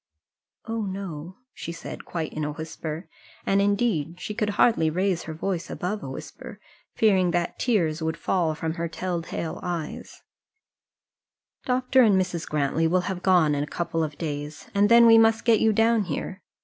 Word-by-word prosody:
"Oh, 225 0 -3
no," 185 -3 -6 0.2
she 170 - -6
said, 165 - -8
quite 165 -3 -4
in 155 - -3
a 150 0 -2
whisper; 160 +1 -6 0.4
and, 195 0 +3
indeed, 200 -6 0
she 210 - -5
could 210 0 -1
hardly 190 -10 +4
raise 185 +2 0
her 160 - -5
voice 180 +1 -3
above 205 +4 -3
a - - -6
whisper, - - -9 0.4
fearing 190 -5 +3
that 175 0 -1
tears 170 -10 +1
would 160 0 -2
fall 165 -4 0
from 160 +1 -3
her 170 - 0
tell 175 +1 -3
tale 165 0 -5
eyes. 170 -4 -5 1.4
"Dr. 255 +1 +3
and 205 -5 +5
Mrs. 180 -3 -3
Grantly 150 +2 +1
will 180 +2 +2
have 180 0 -4
gone 175 -6 +4
in 145 0 0
a - - -5
couple 165 0 -2
of 150 -1 -5
days, 150 -2 -5
and 205 +1 +3
then 235 0 +8
we 225 -1 +8
must 225 0 +3
get 230 -3 +5
you 220 - +4
down 225 0 +3
here. 180 +4 -5
180 Hz, 175 wpm, -25 LUFS, 160-205 Hz, 1.4 s, then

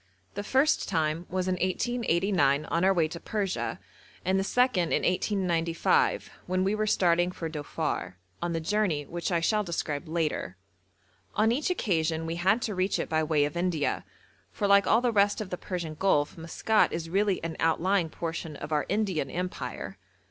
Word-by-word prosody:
The 205 - -3
first 265 +8 +2
time 160 -1 0
was 185 0 -1
in 185 0 0
1889 185 - +1
on 170 +2 0
our 190 - +5
way 170 -4 +2
to 170 - -7
Persia, 200 -1 -2 0.5
and 190 +1 +2
the - - +1
second 215 -6 +2
in - - +1
1895 175 -3 +1 0.2
when 185 +1 +1
we 195 +2 +1
were 215 0 0
starting 175 -2 +3
for 165 -2 -5
Dhofar, 150 - -3 0.3
on 175 - -1
the 165 - -1
journey 165 -4 0
which 175 +5 -4
I 170 -1 +2
shall 210 +5 +2
describe 165 -3 -3
later. 155 - -2 0.8
On 220 +1 +3
each 280 +8 0
occasion 165 - 0
we 165 +1 -3
had 195 +7 +2
to 215 - -2
reach 185 +1 0
it - - -3
by 160 -1 +1
way 150 -2 +2
of 145 - -5
India, 170 -4 0 0.5
for 205 - -2
like 200 -1 +5
all 225 - +4
the 245 -1 +2
rest 205 -1 +3
of 210 -4 -5
the - - -1
Persian 170 -4 -4
Gulf 155 -3 +1
Maskat 170 +6 +1
is 165 0 -3
really 195 +2 +1
an 165 -1 -3
outlying 170 +2 +2
portion 165 -1 -5
of 150 - -7
our 150 -1 0
Indian 200 -5 0
Empire. 180 +1 -5
180 Hz, 180 wpm, -28 LUFS, 165-200 Hz, 0.8 s, our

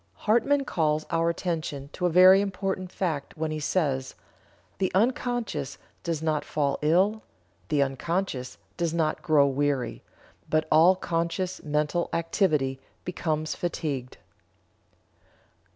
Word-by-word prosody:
'" - - -41
Hartmann 270 +6 +3
calls 155 -6 0
our 165 0 +2
attention 160 -5 -3
to 180 - 0
a - - +1
very 185 +3 +7
important 190 -2 -3
fact 160 -7 -3
when 155 0 -2
he 155 - -3
says: 145 -4 -1 0.6
"The 190 - +1
unconscious 225 - 0 0.2
does 165 -3 -3
not 155 -2 0
fall 145 -2 -1
ill, 190 +8 +3 0.5
the 145 -2 +3
unconscious 135 0 -3 0.2
does 170 -1 -1
not 155 -2 0
grow 150 -3 +4
weary, 140 -1 -1 0.5
but 155 0 +1
all 165 +4 +6
conscious 175 +1 -2
mental 150 +3 0
activity 155 -6 +1 0.3
becomes 155 -3 -2
fatigued." 145 -7 -3
160 Hz, 120 wpm, -27 LUFS, 150-185 Hz, 0.6 s, very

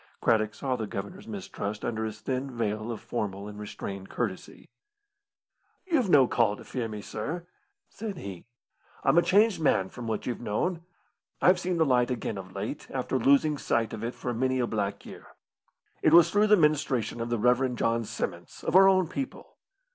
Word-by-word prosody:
Craddock 110 -2 +2
saw 130 -2 -1
the 110 -3 -4
Governor's 180 - -6
mistrust 145 - -5
under 110 -1 -2
his 110 0 -6
thin 130 +3 -2
veil 110 -2 -2
of 110 - -5
formal 100 -3 -4
and 105 0 -9
restrained 100 -2 -6
courtesy. 105 -6 -4 1.2
"You've 305 - +1
no 135 -6 +6
call 115 -4 +2
to - - -12
fear 125 -3 -3
me, 105 -2 -7
sir," 160 +14 -5 0.4
said 210 -3 -6
he; 95 - -8 0.6
"I'm 145 +5 +5
a - - +5
changed 205 0 +3
man 95 -10 +2
from 120 -2 -8
what 110 -2 -2
you've 120 - -3
known. 160 - -1 0.6
I've 180 0 +5
seen 180 -1 -1
the 160 - +4
light 125 -3 +3
again 115 -5 -3
of 95 0 -10
late, 105 +8 -5
after 130 0 -1
losing 140 +4 +3
sight 115 -1 0
of 110 - -5
it 120 +2 -3
for 125 - -3
many 130 +2 0
a 125 - +2
black 100 -3 -3
year. - - -11 0.7
It 155 - +4
was 170 0 +8
through 205 +2 +4
the 210 0 +6
ministration 145 - +1
of 115 - -3
the 120 - 0
Rev. 125 +3 +2
John 115 0 +1
Simons, - - -5
of - - -1
our 195 +1 +9
own 185 -2 +3
people. 265 - -6
125 Hz, 185 wpm, -28 LUFS, 110-160 Hz, 1.2 s, our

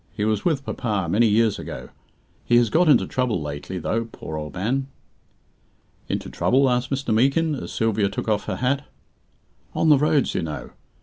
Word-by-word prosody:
"He 105 - 0
was 110 -1 0
with 145 -5 0
papa 105 -4 -2
many 110 +7 +3
years 110 0 +2
ago. - - -7 0.5
He 120 - +3
has 120 -3 +3
got 170 +3 +4
into 145 - +5
trouble 125 -7 -1
lately, 75 +5 -5
though, 115 +5 -1
poor 80 -8 -8
old 75 -2 -6
man." 130 +9 -1 1.2
"Into - - -2
trouble?" 135 0 +2
asked 125 0 0
Mr. 135 -4 -1
Meekin, 140 +8 +2
as 140 - -5
Sylvia 110 -3 +1
took 100 - -5
off 105 -1 0
her - - -2
hat. 135 +3 0 0.9
"On 160 - +2
the 145 -3 +6
roads, 150 -2 +2
you - - -1
know. 75 -6 -6
115 Hz, 180 wpm, -23 LUFS, 100-135 Hz, 1.2 s, the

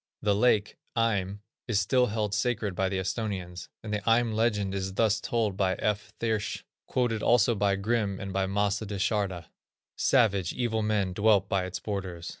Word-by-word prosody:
The 105 -1 +3
lake, 105 -1 +2 0.2
Eim, 100 -3 0 0.3
is 110 -5 +2
still 125 +6 +3
held 105 -1 -2
sacred 110 -5 0
by 95 +1 0
the 95 - -2
Esthonians, 95 -2 -4
and 110 -1 -4
the 105 - 0
Eim 115 +1 +2
legend 105 -3 +1
is 95 -1 -3
thus 110 -1 +2
told 110 -5 0
by 95 -1 +1
F. 105 0 -2
Thiersch, 110 -4 -1 0.2
quoted 120 -4 0
also 120 0 +4
by 100 -2 +1
Grimm 100 -1 -1
and 100 -1 -5
by 95 0 0
Mace 100 0 +1
da 105 -2 -5
Charda: 95 -4 -1 0.5
"Savage, 100 -9 +2
evil 115 -3 -1
men 105 -3 0
dwelt 100 0 +3
by 95 -2 0
its 95 - -5
borders. 95 -5 -5
105 Hz, 175 wpm, -28 LUFS, 95-110 Hz, 0.5 s, also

